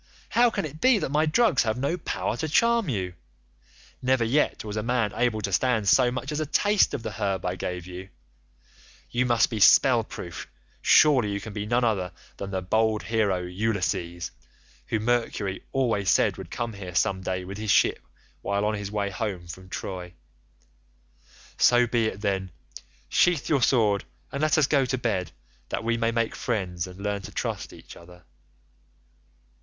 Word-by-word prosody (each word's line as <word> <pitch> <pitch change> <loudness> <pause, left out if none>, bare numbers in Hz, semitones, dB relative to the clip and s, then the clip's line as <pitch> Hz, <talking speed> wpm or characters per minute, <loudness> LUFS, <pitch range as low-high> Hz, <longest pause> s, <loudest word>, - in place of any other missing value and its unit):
How 240 +1 +4
can 225 - -2
it 155 +1 -9
be 255 -3 +5
that 160 - -3
my 155 +2 +2
drugs 165 - +3
have 110 -1 -1
no 140 +6 0
power 180 - -3
to 160 - -3
charm 230 +2 +3
you? 95 -7 -2 0.9
Never 130 -1 +2
yet 125 +1 +1
was 105 -1 -5
any 105 +1 -3
man 120 -4 +1
able 120 -2 0
to 100 - -3
stand 115 -2 +1
so 125 +5 +5
much 125 +3 -4
as 150 - -2
a 155 - -1
taste 205 +7 +3
of 125 - -6
the - - -4
herb 100 -3 -2
I 90 0 -1
gave 90 -1 -4
you; 90 +1 -9 1.0
you 125 +1 +1
must 120 0 +3
be 110 - -2
spell 120 +3 +6
proof; 85 -5 -8 0.3
surely 130 -9 +5
you 100 - -2
can 105 +1 -8
be 105 0 -4
none 120 +2 +1
other 95 -6 0 0.2
than 100 - -5
the 95 -1 -3
bold 110 +2 +1
hero 100 -2 0
Ulysses, 90 -3 -2 0.6
who 110 - 0
Mercury 110 -4 -1
always 115 -7 +1
said - - +3
would - - -8
come 120 -2 -4
here 95 -3 -8
some 95 0 +1
day 95 -1 -3
with 100 +3 -7
his 110 -1 -4
ship - - +4 0.4
while 100 +1 -1
on 105 - +1
his 100 -1 -4
way 100 -1 -2
home 95 -3 -4
from 95 +2 -10
Troy; 90 -1 -6 1.5
so 120 0 +5
be 115 -1 +1
it 105 -1 -5
then; 95 -2 -1 0.6
sheathe 175 -5 +2
your 140 -4 +2
sword 110 -6 +3 0.3
and 140 - -3
let 155 0 +3
us 155 - +5
go 140 -1 +2
to 130 0 -1
bed, 95 -9 -2 0.4
that - - -3
we 115 +1 +1
may 115 0 +1
make 115 -1 0
friends 90 -4 -2
and 90 +1 -12
learn 100 0 -2
to - - -9
trust - - -4
each - - -13
other. 90 0 -15
110 Hz, 185 wpm, -26 LUFS, 95-125 Hz, 1.5 s, spell